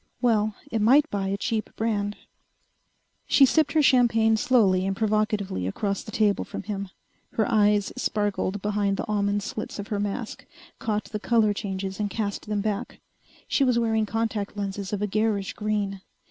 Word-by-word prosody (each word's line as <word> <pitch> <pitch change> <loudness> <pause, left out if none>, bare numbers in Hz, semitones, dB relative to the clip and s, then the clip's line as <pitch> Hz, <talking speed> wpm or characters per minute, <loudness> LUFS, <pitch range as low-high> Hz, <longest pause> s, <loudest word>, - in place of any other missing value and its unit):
Well, 215 -4 +2 0.2
it 225 - 0
might 275 +8 +5
buy 195 -1 -1
a 195 +1 -1
cheap 220 +1 -2
brand.... 210 -2 -1 1.1
She 275 - +6
sipped 290 +1 +2
her 310 -1 +4
champagne 230 -4 +4
slowly 200 -5 +3
and 195 - -1
provocatively 210 - 0
across 200 - -2
the - - -11
table 210 -1 +1
from - - -7
him. 200 -2 -4 0.4
Her 220 - +1
eyes 205 -2 +3
sparkled 205 -5 -1
behind 205 -1 0
the - - -3
almond 205 -1 0
slits 215 +1 -5
of 205 -1 -6
her 205 - -1
mask, 205 +3 -4 0.3
caught 215 -1 -1
the 210 - -3
color 220 -1 +3
changes 195 -1 -4
and 205 -1 -1
cast 205 0 -3
them 210 -1 -1
back. 210 -1 -3 0.5
She 280 - +2
was 250 -3 +3
wearing 220 -2 +1
contact 220 -2 -2
lenses 200 -1 -4
of 205 -1 -2
a - - +1
garish 210 -1 0
green. 205 -2 -2
210 Hz, 170 wpm, -25 LUFS, 200-225 Hz, 1.1 s, She